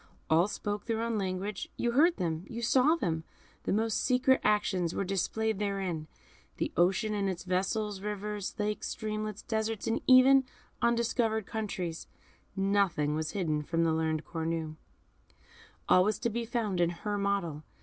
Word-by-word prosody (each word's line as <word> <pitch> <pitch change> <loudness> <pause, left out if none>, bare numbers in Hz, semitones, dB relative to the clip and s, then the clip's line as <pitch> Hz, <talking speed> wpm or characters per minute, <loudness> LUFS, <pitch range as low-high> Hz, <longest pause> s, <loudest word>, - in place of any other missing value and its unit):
All 165 +4 +5
spoke 205 0 -4
their 225 -1 -1
own 230 -2 -1
language, 190 +1 -3
you 240 - 0
heard 325 +8 +4
them, 165 -2 -2
you 235 +1 -5
saw 260 +6 +4
them, 165 - -2 0.4
the - - 0
most 220 +1 +1
secret 260 +1 +3
actions 200 -5 +1
were - - 0
displayed 195 +3 -1
therein: 190 -6 -2 0.5
the - - -1
ocean 195 +6 +2
and 200 -2 0
its 175 -2 -4
vessels, 195 +2 -1
rivers, 210 -1 -4
lakes, 210 0 -2
streamlets, 215 -1 -4
deserts, 220 -2 -2 0.2
even 260 +1 +8
yet 265 - +1 0.4
undiscovered 235 -2 +1
countries, 190 -7 -4 0.5
nothing 195 -7 +1
was 155 0 -2
hidden 160 -6 0
from 165 +3 0
the 165 -1 +2
learned 160 -1 -1
Cornue. 160 -1 -3 1.1
All 185 - +6
was 210 +2 +1
to 235 +1 -1
be 235 +1 -2
found 220 -6 -1
in 170 - +3
her 205 +4 -3
model. 195 -7 -1
205 Hz, 155 wpm, -30 LUFS, 175-220 Hz, 1.1 s, even